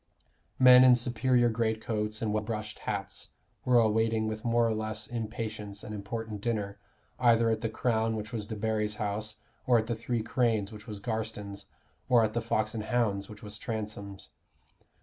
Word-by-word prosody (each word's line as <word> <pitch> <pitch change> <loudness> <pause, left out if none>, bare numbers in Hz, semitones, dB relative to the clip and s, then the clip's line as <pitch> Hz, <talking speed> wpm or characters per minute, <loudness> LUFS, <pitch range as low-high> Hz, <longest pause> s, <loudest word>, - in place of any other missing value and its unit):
Men 125 0 +9
in 130 -1 +8
superior 120 +1 +2
greatcoats 110 -1 -1
and 105 -1 0
well 110 - +1
brushed 105 -1 -5
hats - - -4 0.3
were 125 -1 +4
awaiting 110 0 +3
with 110 0 -4
more 120 -1 +3
or 115 - +1
less 110 0 -3
impatience 110 -3 -5
an 105 - -7
important 105 +1 -5
dinner, 105 -3 -2 0.4
either 115 -2 +4
at 110 -1 -1
the 115 - -1
Crown, 110 0 0
which 110 +2 -6
was 105 -3 -3
Debarry's 110 -1 -1
house, 105 +1 -3 0.3
or 125 -2 +6
at 110 - +1
the 115 - -1
Three 115 0 -2
Cranes, 115 -3 +1
which 105 +1 -11
was 105 -2 -6
Garstin's, 110 -2 -4 0.4
or 120 -2 +6
at 110 0 0
the 120 - 0
Fox 110 -1 0
and 110 -2 -4
Hounds, 105 -5 0
which 105 -1 -11
was 105 +1 -6
Transome's. 105 -4 -5
110 Hz, 170 wpm, -30 LUFS, 105-115 Hz, 0.4 s, Men